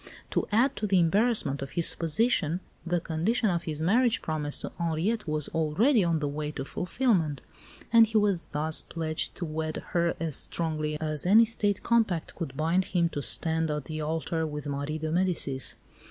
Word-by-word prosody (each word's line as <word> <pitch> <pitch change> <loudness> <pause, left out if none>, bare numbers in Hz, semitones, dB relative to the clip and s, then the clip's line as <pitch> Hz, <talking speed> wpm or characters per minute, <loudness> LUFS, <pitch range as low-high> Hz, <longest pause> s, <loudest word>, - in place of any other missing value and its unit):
To - - 0
add 235 +6 +3
to 210 - -1
the 195 -1 +3
embarrassment 180 - +2
of 135 -1 -6
his 170 - +3
position, 170 -1 +1 0.2
the 175 +1 0
condition 185 +7 0
of 170 -1 -2
his 155 -1 -3
marriage 235 +6 +2
promise 150 -2 -2
to - - -4
Henriette 170 +6 -1
was 155 -1 0
already 185 - +2
on 170 -2 +1
the 150 -1 -2
way 150 +1 -3
to 135 - -5
fulfilment; 175 - 0 0.5
and 230 -1 +8
he 225 0 0
was 200 -5 +1
thus 155 +2 0
pledged 160 -1 -4
to 175 - -4
wed 155 0 -4
her 170 -1 +1
as 160 -4 0
strongly 155 -2 0
as 155 0 -1
any 220 +4 +7
State 205 -3 0
compact 220 -8 +1
could 135 -5 -6
bind 165 +4 +1
him 170 -1 +1
to 145 - -4
stand 160 +3 +2
at 150 -3 -3
the 155 +3 -5
altar 160 +1 -2
with 150 -1 -6
Marie 145 +2 -3
de 155 0 -3
Medicis. 165 -7 -1
165 Hz, 185 wpm, -28 LUFS, 155-195 Hz, 0.5 s, and